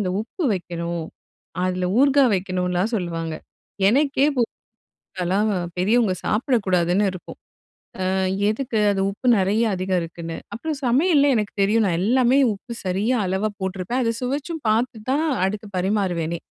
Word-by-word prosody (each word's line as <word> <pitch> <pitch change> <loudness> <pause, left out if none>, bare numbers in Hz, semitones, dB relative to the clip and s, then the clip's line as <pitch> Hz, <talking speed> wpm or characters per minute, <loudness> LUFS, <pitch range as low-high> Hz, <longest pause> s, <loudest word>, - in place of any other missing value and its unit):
இந்த 185 -3 -1
உப்பு 280 - -5
வைக்கணும், 170 -2 -4 0.6
அதுல 185 0 -1
ஊர்காய் 275 -3 +5
வைக்கணும்லாம் 180 +2 -1
சொல்லுவாங்க. 165 -3 -3 0.6
எனக்கே 280 +1 +2
பு 245 - +3 0.8
அதெல்லாம் 190 +4 +1 0.3
பெரியவங்க 210 +2 +2
சாப்பிடக்கூடாதுன்னு 200 - +1
இருக்கும். 185 -1 -10 0.7
அ - - +1 0.4
எதுக்கு 235 0 -2
அது? 195 -1 -1
உப்பு 210 +6 -5
நெறைய 205 +4 +2
அதிகம் 185 0 0
இருக்குன்னு. 165 0 -6 0.2
அப்புறம் 300 +6 -4
சமையல்ல 285 +3 +4
எனக்கு 210 -2 -1
தெரியும் 215 +3 +3
நான் 170 -3 +1
எல்லாமே 250 +4 +3 0.2
உப்பு 235 +4 -9
சரியா 200 +7 +1
அளவா 190 +3 0
போட்டிருப்பேன். 190 +6 -2
அதை 230 - +1
சுவைச்சும் 285 +5 -3
பார்த்து 230 +2 +1
தான் 290 +4 +2 0.2
அடுத்து 210 +2 -3
பரிமாறுவேனே. 180 -4 -1
205 Hz, 130 wpm, -22 LUFS, 180-245 Hz, 0.8 s, ஊர்காய்